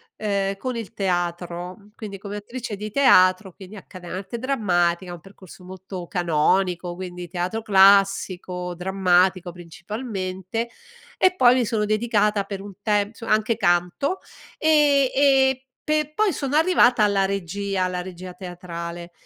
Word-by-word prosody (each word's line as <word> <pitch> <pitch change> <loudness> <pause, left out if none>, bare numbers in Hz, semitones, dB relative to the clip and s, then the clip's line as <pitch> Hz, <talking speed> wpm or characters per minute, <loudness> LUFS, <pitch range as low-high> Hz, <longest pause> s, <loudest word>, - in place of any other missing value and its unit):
ehm, 200 -2 -1
con 255 +3 -4
il 230 -4 -6
teatro. 175 0 -3 0.2
Quindi 205 -3 -8
come 200 +1 -7
attrice 230 +1 -6
di 210 +2 -6
teatro, 190 -7 +4
quindi 195 +3 -12
accade 185 -2 -12
arte 195 +6 -6
drammatica, 180 -8 0
un 175 - -9
percorso 190 -1 -15
molto 185 -1 -8
canonico, 175 +1 0
quindi 180 -1 -7
teatro 180 +5 -3
classico, 195 -3 +3
drammatico 185 0 +1
principalmente, 190 +4 -5 0.5
e 370 0 +4
poi 250 -4 +6
mi 250 -2 +1
sono 210 -2 -1
dedicata 210 -2 +1
per 200 -1 -6
un 200 0 -10
tempo 205 -1 +1
nso 230 0 -11
anche 215 +1 +2
canto. 175 - 0 0.4
Ehm, 295 -4 +4
ehm, 270 -1 +4 0.3
pe 305 -1 0
poi 425 -4 +2
sono 275 0 -3
arrivata 305 -9 +4
alla 200 -2 +2
regia, 195 0 -2
alla 180 -1 -2
regia 180 0 -9
teatrale. 175 -1 -8
195 Hz, 135 wpm, -23 LUFS, 180-225 Hz, 0.5 s, poi